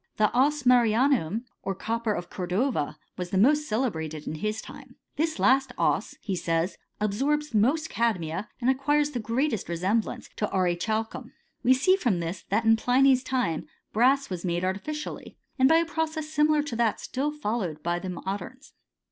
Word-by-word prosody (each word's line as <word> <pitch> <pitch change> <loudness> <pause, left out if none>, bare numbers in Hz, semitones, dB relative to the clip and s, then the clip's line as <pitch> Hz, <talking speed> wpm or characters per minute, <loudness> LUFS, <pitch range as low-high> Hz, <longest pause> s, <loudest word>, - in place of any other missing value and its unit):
The 215 +2 +2
ess 290 +3 +3
marianum^ 240 - +3 0.2
or 195 - -3
copper 230 +3 -2
of 175 -4 -4
Cor 180 -2 -4
dova, 180 - 0 0.2
was 180 -1 -3
the 190 - -1
most 295 +9 +4
celebrated 160 - -2
in - - -4
his 215 +7 -2
time. - - -11 0.2
This 320 +2 -1
last 265 -1 +3
4Bs,he 195 -4 -1
says, 165 +2 -1 0.2
absorbs 275 +8 0
most 270 +10 +2
cadmia, 190 -5 -1
and 245 - -1
acquires 290 +2 +1
the 250 - -3
greatest 230 - -1
resemblance 190 +6 -1
to 210 - 0
aurichalcum. 195 +5 -1 0.3
We 260 +1 +5
see 370 +9 +4
from 235 - +1
this, 170 +1 -4
that 220 +4 +1
in 225 0 +5
Pliny's 260 +2 +4
time 250 -12 -1 0.3
brass 265 +5 +3
was 180 -2 -4
made 175 0 -1
artificially, 300 +12 -5 0.2
and 260 +1 +6
by 320 - +6
a 335 - +2
process 320 -1 -2
similar 305 -1 +2
to 290 -6 -5
that 230 -2 +1
still 275 +3 -2
followed 210 - -3
by 175 +1 0
the 185 - -5
moderns. 195 - -6
230 Hz, 165 wpm, -27 LUFS, 185-275 Hz, 0.3 s, and